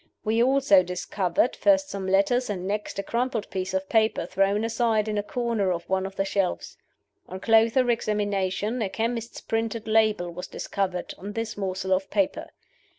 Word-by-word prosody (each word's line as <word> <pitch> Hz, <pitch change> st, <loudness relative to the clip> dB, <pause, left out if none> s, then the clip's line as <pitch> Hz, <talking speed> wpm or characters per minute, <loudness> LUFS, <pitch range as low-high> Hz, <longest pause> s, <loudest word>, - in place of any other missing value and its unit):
We 225 Hz, +1 st, +1 dB
also 260 Hz, -6 st, +5 dB
discovered, 180 Hz, +3 st, -1 dB
first 290 Hz, -1 st, +3 dB
some 195 Hz, -1 st, -4 dB
letters, 200 Hz, +6 st, +2 dB
and 185 Hz, -2 st, -3 dB
next 210 Hz, +1 st, -3 dB
a 200 Hz, -, -2 dB
crumpled 235 Hz, +1 st, -1 dB
piece 185 Hz, 0 st, -3 dB
of 190 Hz, 0 st, -2 dB
paper 220 Hz, +1 st, +2 dB
thrown 195 Hz, +3 st, +1 dB
aside 225 Hz, -2 st, +1 dB
in 215 Hz, -, -2 dB
a -, -, +1 dB
corner 220 Hz, -3 st, -1 dB
of 170 Hz, -1 st, -4 dB
one 190 Hz, 0 st, 0 dB
of 195 Hz, -, -11 dB
the 195 Hz, -, 0 dB
shelves. 195 Hz, -2 st, -1 dB, 0.5 s
On 185 Hz, -, -6 dB
closer 230 Hz, +4 st, +4 dB
examination, 210 Hz, 0 st, -1 dB
a 205 Hz, -, 0 dB
chemist's 230 Hz, +2 st, -3 dB
printed 225 Hz, 0 st, -2 dB
label 215 Hz, -5 st, +2 dB
was 180 Hz, +1 st, -7 dB
discovered 185 Hz, -3 st, -3 dB
on 200 Hz, +2 st, -7 dB
this 225 Hz, 0 st, -3 dB
morsel 190 Hz, -1 st, -2 dB
of 190 Hz, +1 st, -1 dB
paper. 295 Hz, -1 st, 0 dB
210 Hz, 170 wpm, -26 LUFS, 190-230 Hz, 0.5 s, also